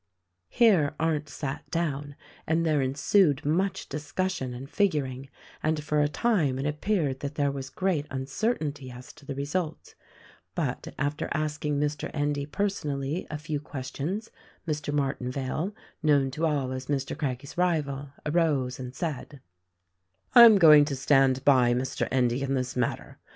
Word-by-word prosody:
Here 180 -12 +4
Arndt 155 -2 0
sat 140 +1 -5
down 145 -4 -2 0.3
and 165 +1 +1
there 155 -3 +2
ensued 140 +3 +2
much 180 +6 0
discussion 150 0 -3
and 125 +2 -7
figuring; 135 -8 -1 0.3
and 155 -1 0
for 150 -1 +1
a 145 - +3
time 150 - +1
it 135 - -3
appeared 150 -2 0
that 145 +1 -5
there 145 -2 +1
was 135 -1 -6
great 175 -5 -1
uncertainty 140 - -2
as 125 0 -11
to 140 - -18
the 140 - -4
result; 150 +4 -3 0.6
but, - - -2
after 145 +2 -2
asking 150 -1 -1
Mr. 150 0 -2
Endy 145 -1 -1
per 200 +7 -1
sonally 150 -4 -3
a 150 - -4
few 150 0 -3
questions, 150 - -5 0.4
Mr. 150 -1 -2
Martinvale, 135 +4 -2 0.3
known 145 -4 +3
to 160 +5 0
all 140 -4 -1
as 130 0 -5
Mr. 140 -2 -2
Craggie's 135 -1 -4
rival, 145 -6 0 0.2
arose 150 -6 +1
and 125 0 -7
said: 145 -3 -4 0.9
"I 240 -2 +11
am 220 -3 +8
going 155 -5 +8
to 145 -1 -3
stand 135 -1 +3
by 125 -4 +5
Mr. 130 +1 -2
Endy 125 0 +1
in 135 0 0
this 130 -1 -2
matter. 125 -2 -2
145 Hz, 150 wpm, -27 LUFS, 135-155 Hz, 0.9 s, I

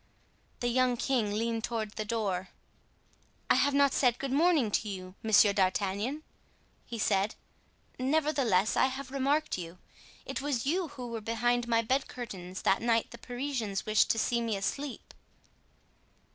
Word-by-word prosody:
The 245 - 0
young 250 0 +2
king 235 -5 0
leaned 225 0 -1
toward 225 -3 -2
the 215 - -4
door. 200 -5 -2 1.0
"I - - +9
have 285 0 +3
not 280 -1 +4
said 245 -3 +3
good 275 -1 -4
morning 295 -6 +3
to 215 - 0
you, 185 -2 -7
Monsieur 210 -2 +5
d'Artagnan," 200 +8 0 0.6
he 235 - -5
said; 200 -1 +1 0.6
"nevertheless, 265 -8 +2
I - - +4
have 265 0 -6
remarked 280 -2 0
you. 170 0 -7 0.5
It - - -4
was 275 -4 -1
you 345 +5 +1
who 260 -5 -8
were 230 -1 -4
behind 235 +2 0
my 230 -1 +2
bed 265 +4 0
curtains 185 -7 -7
that 195 - +3
night 230 -1 +1
the 235 - -10
Parisians 245 -6 -3
wished 215 -1 +3
to - - +2
see 235 +2 +1
me 230 -2 -1
asleep." 275 +7 -4
235 Hz, 155 wpm, -30 LUFS, 210-270 Hz, 1.0 s, I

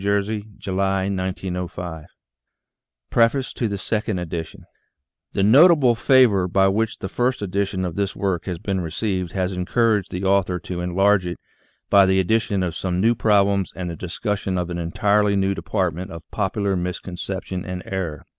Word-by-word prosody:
J.,July, 95 -4 -2 1.1
PREFACE 120 +3 +2
TO 105 -4 -2
SECOND 105 +1 -2
EDITION 85 -2 -6 0.7
THE 100 - +1
notable 140 - +6
favor 115 -6 +4
with 95 +1 +3
which 110 +1 -1
the 95 - -5
first 125 +3 -1
edition 95 -1 -1
of 90 - -3
this 100 +2 -2
work 95 -4 -1
has 90 -3 -3
been 95 +2 -2
received 90 +1 -2
has 95 0 -1
encouraged 105 +2 +1
the 90 +2 -4
author 95 -2 +2
to 90 +1 -5
en 90 0 -4
large 100 -1 +3
it 85 - -4 0.5
by 100 -1 +7
the 95 0 +3
addition 100 0 +1
of 85 -2 -3
some 90 0 -2
new 115 +4 +4
problems 100 -4 +2
and 90 -2 -4
the - - -6
discussion 95 +2 -3
of 90 0 -2
an 85 - -3
entirely 100 +4 +2
new 95 0 +1
department 95 -2 -2
of 85 -2 -9
popular 100 -1 -1
mis 90 0 -2
conception 95 0 -5
and 90 0 -6
error. 85 -7 -4
95 Hz, 155 wpm, -22 LUFS, 90-105 Hz, 1.1 s, by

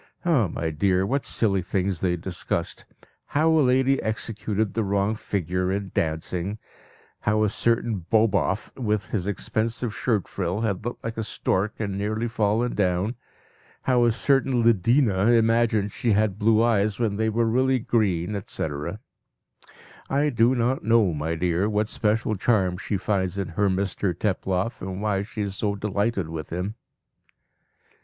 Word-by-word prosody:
Ah, 145 - +3
my 80 -1 -3
dear! 95 +4 +1
what 135 +6 -1
silly 100 -4 +1
things 95 0 -1
they 90 0 +1
discussed 90 0 -4 0.5
how 160 +2 +4
a 160 -1 +4
lady 130 +1 +3
executed 110 -1 -2
the 115 - 0
wrong 100 +1 +1
figure 90 -3 -2
in 100 -1 -3
dancing; 85 +5 -2 0.6
how 110 +1 +1
a 105 - +2
certain 115 -5 0
Boboff, 105 -2 +1
with 105 -4 -2
his 100 -4 -1
expansive 110 +3 -2
shirt 110 -6 0
frill, 95 +2 -2
had 105 -3 -1
looked 120 +2 -5
like 115 0 -4
a 110 - -1
stork 100 -1 -1
and 100 -3 -3
nearly 110 +3 -1
fallen 115 +2 0
down; 95 +2 0 0.7
how 125 -2 +3
a 120 - +4
certain 130 0 +2
Lidina 115 -1 +3
imagined 115 -2 +2
she 115 +1 0
had 105 -1 +1
blue 110 +1 +4
eyes 105 -3 +2
when 110 -4 0
they 110 0 +1
were 115 +2 +1
really 130 +3 +2
green, 105 -6 0
etc. 75 -7 -4 1.1
"I 145 +2 +2
do 120 0 +3
not 125 +2 0
know, 110 -4 +3
my 80 +2 -2
dear, 90 +4 0
what 105 0 0
special 110 0 0
charm 95 -3 +1
she 100 - -2
finds 95 -1 -1
in 95 -3 -2
her 100 +4 +1
Mr 95 -1 -1
Teploff, 95 +2 -1
and 95 0 -5
why 100 -2 0
she 110 +2 -5
is 100 -1 -4
so 100 0 -1
delighted 100 -2 -1
with 80 -1 -6
him." 90 +5 -3
105 Hz, 155 wpm, -25 LUFS, 95-115 Hz, 1.1 s, how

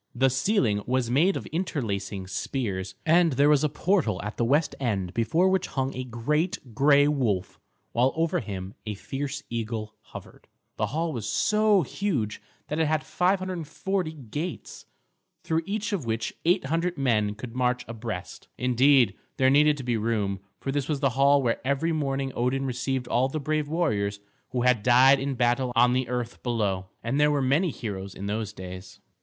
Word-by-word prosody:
The 130 +2 +3
ceiling 130 - +1
was 125 -1 0
made 170 +9 +3
of - - -6
interlacing 110 - -3
spears, 95 -2 -3
and 165 -1 +4
there 140 +3 +4
was 150 -1 +4
a 150 - +2
portal 150 - +1
at 105 +1 -5
the - - -1
west 145 +6 +2
end 100 -8 -1
before 140 - +2
which 190 -1 +1
hung 135 0 -2
a 130 - -3
great 130 +3 -2
gray 145 +3 +5
wolf, 120 -11 -1 0.3
while 125 +3 +3
over 165 +2 +1
him 95 - -6
a 105 - -3
fierce 145 +6 -5
eagle 110 -2 -3
hovered. - - -12 0.3
The - - 0
hall 160 +2 -2
was 110 -4 -4
so 215 -3 +3
huge 135 - -2 0.3
that 150 - -2
it 160 - +3
had 155 0 0
540 185 -1 -1
gates, 150 +5 -6 0.6
through 160 0 0
each 210 +1 -2
of 185 -8 -1
which 115 0 -2
800 170 0 +1
men 110 -6 +1
could 115 +2 -8
march 125 -1 0
abreast. 110 -5 -6
Indeed, 125 -2 +4 0.2
there 130 0 +4
needed 150 +1 +5
to 135 - -6
be 120 -2 0
room, 105 -3 -1 0.2
for 135 - -3
this 140 -1 -1
was 150 -3 0
the 135 -1 +2
hall 140 +2 +4
where 115 -2 0
every 140 +5 0
morning 135 -3 -1
Odin 130 +3 0
received 130 0 -2
all 125 +2 +2
the 155 - -3
brave 150 +1 -1
warriors 105 -11 0 0.3
who 125 -1 -1
had 125 -3 +3
died 130 +4 +6
in 135 0 -2
battle 120 +1 +1
on 120 +1 +5
the 130 -1 0
earth 120 -1 -3
below; 100 -6 -1 0.2
and 120 +5 0
there 150 0 +5
were 145 -1 +1
many 140 +7 +2
heroes 100 -7 -6
in 100 - -6
those 105 0 -2
days. 95 -2 -9
130 Hz, 175 wpm, -26 LUFS, 115-150 Hz, 0.6 s, died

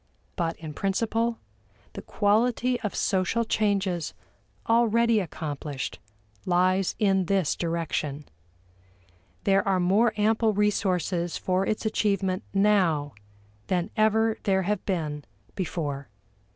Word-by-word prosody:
But 165 -2 -2
in 155 -2 -8
principle, 225 +6 0 0.6
the - - -7
quality 240 +4 +1
of 210 - -3
social 195 +5 +1
changes 195 -6 0 0.5
already 230 0 +3
accomplished 150 -5 -5 0.4
lies 185 +1 +2
in 195 -3 +2
this 190 -3 +1
direction. 160 -4 -2 1.2
There 195 -1 +4
are 190 -1 +2
more 200 +6 +3
ample 220 +1 +2
resources 185 -4 0
for 185 +1 0
its 215 - -2
achievement 195 -3 0
now 185 -8 +2 0.5
than 180 +1 -1
ever 220 0 +2
there 190 -1 +1
have 210 +3 -1
been 155 -6 -2 0.3
before. 145 - -4
195 Hz, 105 wpm, -26 LUFS, 170-215 Hz, 1.2 s, There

